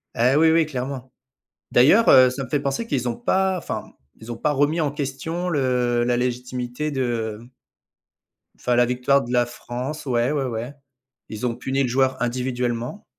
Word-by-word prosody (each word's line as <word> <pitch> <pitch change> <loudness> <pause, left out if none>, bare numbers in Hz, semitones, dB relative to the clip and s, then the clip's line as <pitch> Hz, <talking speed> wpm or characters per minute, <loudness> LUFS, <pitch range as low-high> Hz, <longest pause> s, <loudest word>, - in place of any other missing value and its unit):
Eh 125 +3 +3
oui, 160 +2 +5
oui 165 0 +4
clairement. 130 -2 -5 0.6
D'ailleurs, 155 - +5
heu, 130 -1 +8
ça 135 +2 -4
me - - -10
fait 145 +3 0
penser 140 +10 -2
qu'ils 125 - -1
ont 115 - -3
pas 190 0 +1
enfin, - - -6 0.2
ils 115 +1 -11
ont - - -6
pas 150 +6 0
remis 145 +4 +1
en 150 -3 +1
question 150 +5 -4
le 125 -6 +1
la 120 0 +1
légitimité 125 +3 -3
de, 120 -6 -2
mmh 120 - -15 1.1
enfin 125 - -1
la 120 0 +4
victoire 125 +3 +2
de 120 - -7
la 120 -1 +3
France, 125 +5 -6
ouais, 120 0 +1
ouais, 145 -3 -1
ouais. 120 +2 -4 0.6
Ils 110 +2 -5
ont 115 - -2
puni 135 +2 -1
le 125 - -1
joueur 130 0 +1
individuellement. 125 - -2
130 Hz, 180 wpm, -23 LUFS, 120-145 Hz, 1.1 s, heu